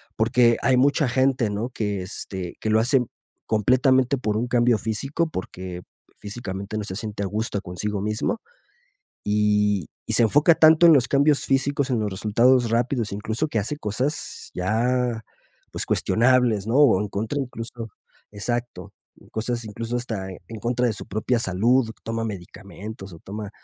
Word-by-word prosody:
Porque, 115 +1 +3
hay 130 -1 +3
mucha 140 +1 +3
gente, 130 -2 +2
¿no? 105 +4 -3
Que, 105 -5 -3
este, 90 -1 -6
que 110 - -1
lo 110 +1 +4
hace 125 +3 +3 0.4
completamente 130 +4 +3
por 110 -4 -1
un 120 - -1
cambio 120 -1 +3
físico, 135 +10 -2
porque, 90 - -6 0.4
físicamente 100 -1 -6
no 105 - -2
se 95 - -3
siente 105 -1 -4
a - - -1
gusto 105 +1 -2
consigo 100 +3 -4
mismo. 105 - -1 0.8
Y 105 -3 +1 0.2
y - - -2
se - - +3
enfoca 145 +9 +5
tanto 160 +1 +6
en 165 - +9
los 130 -3 +4
cambios 140 +2 +3
físicos, 140 +1 0
en 120 -3 +1
los 105 -2 -2
resultados 115 +5 +3
rápidos, 115 -1 0
incluso 110 +8 -2
que 130 - -3
hace 110 +8 -1
cosas 125 +7 -3
ya, 115 +4 0 0.5
pues, - - -2
cuestionables, 120 -3 +2
¿no? 115 - 0
O 135 -9 +5
en 105 - -2
contra 110 +8 -3
incluso, 115 -3 -6 0.4
exacto. 115 -2 -4 0.4
Cosas 115 +1 -3
incluso 115 +3 -5
hasta 110 -6 -4 0.2
en 110 -1 -8
contra 120 +2 0
de 115 - +1
su - - -9
propia 110 +4 0
salud, 115 +5 +2
toma 115 0 -3
medicamentos 100 0 -8
o - - -10
toma 105 +2 -7
115 Hz, 160 wpm, -24 LUFS, 105-125 Hz, 0.8 s, en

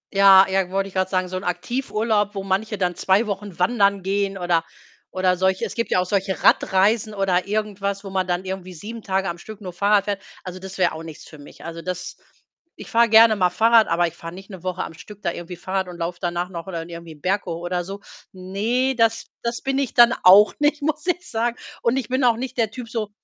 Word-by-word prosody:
Ja, 195 -1 +8
ja, 190 -1 0
wollte 195 +1 -1
ich - - -18
grad 185 0 0
sagen, 185 -1 0
so 185 +1 -4
'n 190 - -6
Aktivurlaub, 210 +1 -1
wo 195 - -3
manche 200 +3 -1
dann 180 -2 0
2 195 +6 +2
Wochen 200 -2 -5
wandern 200 0 +2
gehen 195 0 -1
oder 175 -2 +1 0.5
oder 185 -1 +1
solche 190 0 +1
es - - -6
gibt 230 - -2
ja - - +2
auch 180 - 0
solche 190 0 -2
Radreisen 210 +3 +3
oder 190 -1 +1
irgendwas, 200 -1 -2
wo 195 - -8
man 185 -1 -1
dann 180 +1 -2
irgendwie 185 -1 -6
7 225 +7 -8
Tage 195 -1 -1
am 170 0 -4
Stück 215 +3 -10
nur 185 -4 -8
Fahrrad 200 +2 +2
fährt. 200 -1 -3 0.2
Also, 185 0 -7
das 190 +1 -9
wär 175 -3 +2
auch 160 - -7
nichts 160 -2 -10
für 155 - -13
mich. 145 +2 -14
Also, 165 0 -6
das 180 0 -5 0.6
ich - - -11
fahre 230 0 +4
gerne 220 0 +7
mal 180 -2 +2
Fahrrad, 225 +4 +4
aber 175 +1 +2
ich - - -8
fahre 165 +1 -9
nicht 195 +2 -12
'ne 185 -3 -9
Woche 185 0 -3
am - - -8
Stück 205 +5 -13
da 170 - 0
irgendwie 175 +1 -8
Fahrrad 190 +1 -3
und 175 -1 -9
laufe 170 +1 -4
danach 175 0 -2
noch 170 0 -7
oder 170 -3 -5
irgendwie 170 -1 -9
'n 145 - -22
Berg 195 +2 0
hoch 170 0 -4
oder 175 0 -2
so. 195 +3 -7 0.3
Ne, 215 +8 -1
das 225 -1 +2 0.2
das 235 0 -3
bin 270 0 0
ich 270 -5 -2
dann 240 0 +7
auch 200 +3 +8
nicht, 295 0 +1
muss 310 +4 -2
ich 355 0 -1
sagen. 235 +2 -1 0.2
Und 240 +3 +1
ich 255 - -2
bin 260 +1 0
auch 235 -2 +4
nicht 255 0 -6
der 220 -2 +2
Typ 240 0 -8
so 220 -3 -3
195 Hz, 240 wpm, -22 LUFS, 180-220 Hz, 0.6 s, Ja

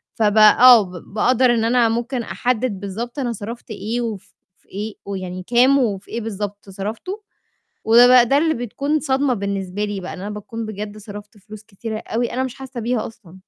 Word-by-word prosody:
فبقى 215 -1 +5
آه، 245 -3 +10
ب 180 - -10 0.2
بأقدر 250 +2 +3
إن 225 - 0
أنا 235 -1 +3
ممكن 240 +2 -2
أحدد 240 -3 -1
بالضبط 225 +7 -5
أنا 245 -3 -1
صرفت 230 +3 -8
إيه 220 +3 -3
وف 205 -5 -6 0.3
في - - -35
إيه 210 +2 -5
ويعني 185 -2 -5
كام 255 +4 +4
وفي 205 -6 -2
إيه 235 - -3
بالضبط 205 -2 -6
صرفته، 220 - -6 0.6
وبقى 245 +2 +7
ده 275 +4 +3
اللي 315 +1 +2
بتكون 280 +6 -2
صدمة 270 -2 +1
بالنسبة 200 -1 -3
لي 205 -1 -4
بقى، 185 - -7
إن - - -9
أنا 200 +2 -5
باكون 220 +2 -6
بجد 210 0 -6
صرفت 205 0 -11
فلوس 210 +1 -12
كتيرة 215 +1 -6
أوي، 235 +2 -3
أنا 255 - -1
مش 260 - -5
حاسّة 265 -2 -7
بيها 230 0 -1
أصلًا. 195 -6 -16
225 Hz, 185 wpm, -20 LUFS, 205-245 Hz, 0.6 s, آه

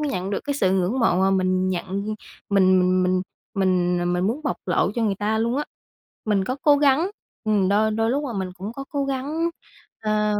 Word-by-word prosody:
nhận 195 -11 -2
được 200 - -1
cái 285 -1 -1
sự 190 -9 +2
ngưỡng 190 +2 +1
mộ 230 -7 +3
mà 190 - +3
mình 185 -1 +1
nhận 195 +4 -3 0.4
mình 185 -2 +5
mình 185 0 +2
mình 185 0 +1 0.3
mình, 180 -2 +1
à, 175 - -1
mình 180 +1 0
muốn 245 +8 -1
bộc 285 - -1
lộ 180 +1 +2
cho 235 - -1
người 210 -3 +1
ta 210 +2 -1
luôn 235 +3 0
á. 295 - -1 0.6
Mình 205 -3 +1
có 255 +6 -2
cố 295 -3 +6
gắng, 290 +5 +3 0.3
ừm, 205 -3 +2
đôi 215 +2 +3
đôi 225 +1 0
lúc 285 +4 0
là 240 - -4
mình 190 -3 -3
cũng 195 +4 -6
có 275 +3 -7
cố 280 -2 -1
gắng, 285 +5 -1 0.5
à, 210 -1 0
210 Hz, 220 wpm, -23 LUFS, 185-255 Hz, 0.6 s, cố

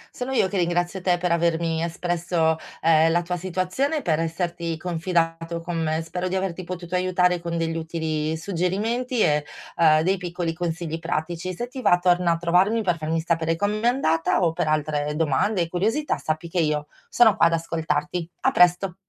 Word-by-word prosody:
Sono 250 +1 -4
io 250 -7 +2
che 200 - -3
ringrazio 175 +2 0
te 180 -1 +2
per 180 0 -1
avermi 165 -1 +1
espresso, 170 -1 0 0.3
ehm, 165 0 +5
la 175 +1 +2
tua 180 +1 -3
situazione 185 - -1
e - - -2
per 160 -3 +1
esserti 170 0 -2
confidato 165 -1 -1
con 170 0 -4
me. 160 0 -1
Spero 180 +3 -4
di 185 - -2
averti 185 -1 -2
potuto 175 0 -7
aiutare 180 -1 +2
con 170 0 -4
degli 165 0 -1
utili 160 -1 -2
suggerimenti 210 +8 -1
e, 150 -1 +3 0.3
uhm, 155 -2 +5
dei 190 +4 +1
piccoli 175 -2 -3
consigli 165 -1 -3
pratici. 170 +2 -3
Se 240 +6 -4
ti 255 +1 -8
va 175 - +4
torna 175 -1 +2
a 165 - -2
trovarmi 185 +7 +2
per 180 -4 +1
farmi 160 +1 -1
sapere 165 0 0
come 205 +4 -1
è 235 - +2
andata, 165 -13 +1
o 165 -2 +2
per 160 - -1
altre 150 -1 0
domande 165 +6 +1
e 170 - 0
curiosità 220 - 0
sappi 155 +2 -3
che 175 +1 -2
io 150 -2 0 0.2
sono 230 -4 +5
qua 170 - +5
ad 170 - 0
ascoltarti. 165 +1 -2
A 265 - +3
presto. 180 -2 +3
170 Hz, 190 wpm, -24 LUFS, 165-185 Hz, 0.3 s, ehm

